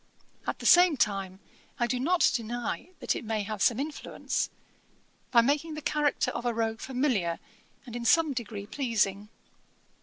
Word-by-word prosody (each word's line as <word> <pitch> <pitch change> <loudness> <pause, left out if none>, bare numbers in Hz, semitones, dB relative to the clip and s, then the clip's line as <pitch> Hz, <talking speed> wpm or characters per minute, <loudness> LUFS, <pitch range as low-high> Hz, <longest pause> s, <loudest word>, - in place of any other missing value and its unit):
At - - -1
the - - -9
same 350 -4 +7
time 195 -4 -1 0.4
I 240 - +3
do 245 +1 -1
not 350 +7 +3
deny 240 +7 -3
that - - 0
it - - -5
may 220 -2 -2
have 210 -1 -5
some 240 -1 +3
influence, 295 +2 -3 0.8
by 235 - +6
making 295 +5 0
the 305 - -6
character 295 -1 +1
of 235 - -5
a 240 -2 -1
rogue 225 0 -1
familiar, 250 - 0 0.5
and 240 -2 -9
in 240 -1 -4
some 320 +3 +4
degree 215 -5 -5
pleasing.' 210 -5 -1
240 Hz, 160 wpm, -28 LUFS, 215-285 Hz, 0.8 s, same